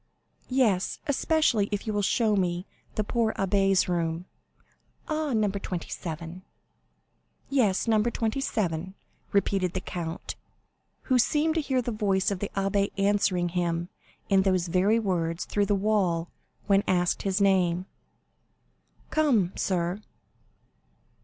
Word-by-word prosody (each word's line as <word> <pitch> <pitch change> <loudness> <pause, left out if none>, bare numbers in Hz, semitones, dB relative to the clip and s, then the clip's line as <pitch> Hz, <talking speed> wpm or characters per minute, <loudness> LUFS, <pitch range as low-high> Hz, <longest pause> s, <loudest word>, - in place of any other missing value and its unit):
"Yes, 230 -8 +2
especially 285 -7 +2
if 205 -1 -2
you 215 - -2
will 205 - +1
show 215 +1 +2
me 180 -1 0 0.3
the 215 - 0
poor 225 +1 0
abbé's 195 -1 +2
room." 170 -1 -1 0.8
"Ah! 310 -2 -1
No. 215 -2 +2
27." 175 -3 -5 1.1
"Yes; 230 -7 +2
No. 220 -2 +4
27." 215 - -1 0.4
repeated 195 -3 +1
the 185 - -1
count, 170 -2 -5 0.7
who 255 -2 +2
seemed 305 +6 +2
to 325 - +1
hear 260 -3 0
the 240 - -2
voice 200 -2 +1
of 195 - -2
the 205 - -3
abbé 195 0 +1
answering 195 -3 +2
him 170 0 -1 0.4
in 195 -1 +4
those 185 -2 +1
very 190 +6 +3
words 175 -6 -1
through 205 -1 0
the 205 - +2
wall 190 -5 +1 0.3
when 195 -1 +4
asked 180 -1 +1
his 195 0 0
name. 185 -3 +2 1.3
"Come, 250 - +2
sir." 180 +1 -1
195 Hz, 125 wpm, -27 LUFS, 180-215 Hz, 1.3 s, No